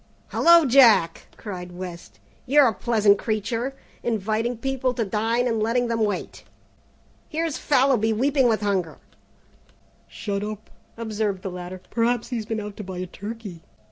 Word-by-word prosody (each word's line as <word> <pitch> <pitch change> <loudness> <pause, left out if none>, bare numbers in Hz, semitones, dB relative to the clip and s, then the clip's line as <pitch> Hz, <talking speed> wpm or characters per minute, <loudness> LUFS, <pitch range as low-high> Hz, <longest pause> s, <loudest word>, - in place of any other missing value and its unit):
"Hello, 340 -1 +6
Jack!" 235 -10 +5
cried 180 -4 -7
West, 175 -1 -9 0.3
"you're 285 +1 +6
a 225 - +1
pleasant 210 -2 +3
creature, 230 +4 -2 0.3
inviting 225 +2 -1
people 260 0 -1
to 230 - -1
dine 225 +5 0
and 225 -2 0
letting 235 +2 +1
them 230 -1 0
wait. 205 -1 -3 0.9
Here's 325 -1 -2
Fallowby 255 -5 +3
weeping 265 +4 +2
with 220 -2 +1
hunger 190 -5 -1 0.6
" - - -34 0.2
"Shut 200 -1 -4
up," 215 0 -7 0.3
observed 215 -4 -2
the 190 - -4
latter, 180 +1 -7
"perhaps 235 0 0
he's 230 -4 -4
been 225 -1 -2
out 210 -1 -7
to 210 - -6
buy 190 -1 -7
a 180 - -3
turkey." 200 -1 -8
220 Hz, 150 wpm, -24 LUFS, 200-245 Hz, 0.9 s, Hello